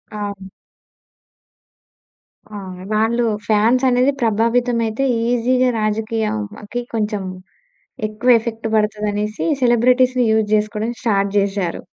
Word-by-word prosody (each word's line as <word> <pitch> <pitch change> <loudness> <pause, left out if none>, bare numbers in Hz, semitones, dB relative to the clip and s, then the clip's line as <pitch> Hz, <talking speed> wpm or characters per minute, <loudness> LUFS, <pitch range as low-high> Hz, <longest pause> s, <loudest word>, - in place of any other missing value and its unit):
అవును. 200 -2 -5 2.1
ఆ! - - -5 0.4
వాళ్ళు 225 +3 +1 0.2
ఫాన్స్ 225 +4 +3
అనేది 250 +2 +3
ప్రభావితమైతే 230 +1 +1 0.3
ఈజీగా 250 +1 +2
రాజకీయం 215 0 -1 0.3
అకి 240 +4 -4
కొంచెం, 210 -2 -1 0.9
ఎక్కువ 235 +3 +3
ఎఫెక్ట్ 225 -1 -5
పడతది 210 0 0
అనేసి 210 +1 -3 0.2
సెలబ్రిటీస్‌‌‌‌‌‌‌‌‌‌‌ని 250 +1 +3
యూజ్ 220 -1 +1
చేసుకోవడం 215 +2 -2
స్టార్ట్ 200 -4 +1
జేశారు. 195 -3 -1
220 Hz, 95 wpm, -19 LUFS, 210-240 Hz, 2.1 s, ఫాన్స్